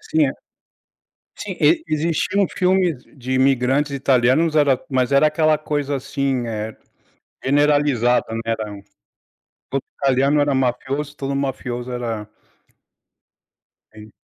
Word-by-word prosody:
Sim, 155 -2 +1
é - - 0 1.1
sim, - - -6
e 335 -1 +4
existiam 165 +5 +1
filmes 180 -7 +1
de 130 -1 -5
imigrantes 135 +2 +2
italianos, 135 +4 +2
era 140 -4 +3
mas 130 0 +1
era 140 +2 +5
aquela 155 0 +2
coisa 145 -2 -2
assim, 135 -2 -2
eh, 110 -1 -4 0.7
generalizada, 145 -3 +2
né, 115 - -2
era 110 -2 -2 1.0
todo 135 0 -1 0.2
italiano 135 +2 +3
era 145 -1 +2
mafioso, 135 +3 -2
todo 140 -1 -3
mafioso 125 -2 -3
era 115 -4 -4 1.6
Sim. 110 -1 -13
135 Hz, 115 wpm, -21 LUFS, 125-150 Hz, 1.6 s, era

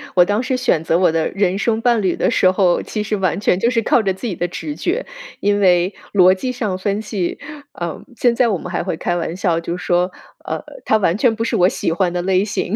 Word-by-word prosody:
我 180 -1 +6
当 205 +5 0
时 260 0 -1
选 165 -10 +1
择 165 +1 +2
我 180 - +4
的 160 -1 0
人 195 -1 0
生 220 +1 0
伴 235 -2 +2
侣 185 -3 +1
的 - - +1
时 185 - +3
候， 185 -2 +2
其 215 - -4
实 210 0 -1
完 190 -2 0
全 190 -2 +1
就 235 - +2
是 230 - +1
靠 225 +1 +2
着 195 -2 +1
自 190 +6 -6
己 190 - -3
的 175 - -2
直 160 -3 -6
觉。 380 - -2 0.3
因 205 0 +1
为 180 0 +3 0.2
逻 185 -2 +6
辑 250 +7 -3
上 215 -7 -3
分 200 +2 -2
析， 200 -5 -3 0.4
嗯， 170 -2 -4
现 240 0 +2
在 240 -2 +3
我 195 - 0
们 180 +2 -8
还 - - -1
会 - - -2
开 175 - -1
玩 170 0 -3
笑， 175 -3 0
就 170 +1 -4
说， 180 0 0 0.3
呃， - - -3 0.2
他 220 - +3
完 185 -3 +1
全 225 -1 +2
不 225 - -2
是 230 - -1
我 180 +1 +4
喜 - - -2
欢 175 +1 0
的 175 - -1
类 185 +1 +2
型。 205 0 -2
190 Hz, 275 characters per minute, -19 LUFS, 175-220 Hz, 0.4 s, 我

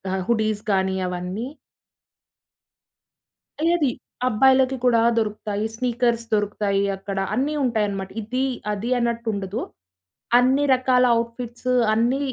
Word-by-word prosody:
ఆహ్, 190 - -2
హుడీస్ 215 -2 +1
కానీ 190 0 +1
అవన్నీ. 180 +6 -4 2.2
ఏది, 310 -6 +2 0.4
అబ్బాయిలకి 265 +3 +4
కూడా 235 -2 +4 0.2
దొరుకుతాయి. 210 -1 -2
స్నీకర్స్ 235 -1 0
దొరుకుతాయి 205 -1 0
అక్కడ. 195 0 -6 0.2
అన్నీ 275 +7 0
ఉంటాయనమాట. 205 -5 -1
ఇది, 255 +5 -1 0.3
అది 210 +4 -4
అన్నట్టుండదు 230 -3 -2 0.8
అన్ని 260 +3 +3
రకాల 255 0 +3 0.2
ఔట్‌ఫిట్స్ 235 +1 -4 0.2
అన్ని 240 +5 +1
230 Hz, 95 wpm, -23 LUFS, 205-250 Hz, 2.2 s, అబ్బాయిలకి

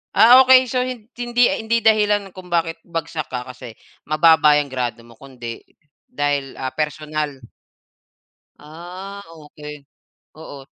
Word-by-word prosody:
Ah, 245 +3 +8
okey. 260 0 +6
So 250 +1 -1
hindi 245 0 -2
hindi 230 +1 -1
dahilan 210 -3 +2
kung 185 -1 -12
bakit 165 -1 -1
bagsak 165 -3 -5
ka 125 -1 -5
kasi 125 -3 -11 0.3
mababa 155 -1 +5
yung 145 - 0
grado 120 -2 -4
mo 120 - -16
kundi 120 -2 -9 0.5
dahil, 145 -2 -2
ah, 130 0 -5
personal. 150 -1 -3 1.2
Ah, 180 +6 -10
okey. 150 -1 -12 0.5
Oo. 145 -3 -11
155 Hz, 120 wpm, -20 LUFS, 140-205 Hz, 1.2 s, Ah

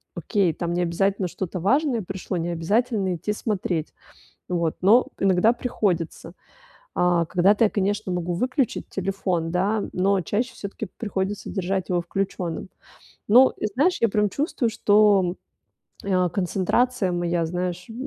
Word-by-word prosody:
окей, 195 -6 +1
там 170 +2 -3
необязательно 180 +3 0
что-то 180 +1 -5
важное 255 - +2
пришло, 190 -1 -5
необязательно 190 +5 0
идти 185 +5 -3
смотреть, 185 -7 -2 0.6
вот. 170 -3 -1
Но 220 +7 +5
иногда 195 +3 +4
приходится. 185 -8 -2 0.6
А, 175 -2 +2
когда-то 195 +6 +3
я, 210 - +3
конечно, 200 -1 -1
могу 175 0 -2
выключить 255 +4 -1
телефон, 185 -3 -2
да, 200 +4 +1
но 195 +2 +2
чаще 235 +8 -2
всё-таки 205 0 -6
приходится 205 -2 -3
держать 190 -1 -2
его 175 -1 +2
включенным. 185 -1 -3 0.6
Но, 250 +5 +6 0.2
знаешь, 320 +9 +2
я 230 - +5
прям 210 0 +2
чувствую, 280 - -1
что, 205 -4 +3 0.7
а, 185 -2 +2
концентрация 195 +3 0
моя, 175 -1 0
знаешь, 180 +1 -3
э, - - -7
190 Hz, 130 wpm, -24 LUFS, 175-215 Hz, 0.7 s, Но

